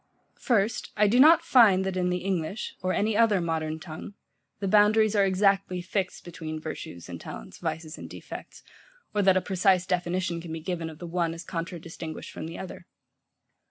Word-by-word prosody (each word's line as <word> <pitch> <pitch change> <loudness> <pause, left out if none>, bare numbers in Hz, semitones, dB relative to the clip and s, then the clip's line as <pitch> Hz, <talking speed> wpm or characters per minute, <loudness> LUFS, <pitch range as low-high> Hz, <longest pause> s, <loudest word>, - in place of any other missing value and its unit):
First, 225 -1 +1
I 210 - +5
do 235 +5 +3
not 320 +4 +8
find 215 - +5
that 190 -1 -2
in 180 -1 +1
the 180 0 -1
English, 190 +2 -2
or 185 0 0
any 215 +2 +1
other 220 -3 +4
modern 160 -2 -2
tongue, 160 +4 -9 0.4
the 195 - -2
boundaries 215 +2 +4
are 200 - +5
exactly 195 -1 +2
fixed 185 +1 -3
between 160 -2 -6
virtues 155 - -7
and 85 -2 -8
talents, - - -9
vices 160 0 -4
and - - -8
defects, - - -9 0.5
or 210 - +2
that 190 -1 +5
a - - +2
precise 185 -1 +2
definition 180 -1 -1
can 165 -1 -8
be 160 - -4
given 165 -1 -3
of 155 - -11
the 175 - -8
one 170 -1 -1
as 165 - -8
contradistinguished 165 -2 -6
from - - -6
the 165 - -7
other. 180 -2 -8
180 Hz, 185 wpm, -27 LUFS, 165-200 Hz, 0.5 s, not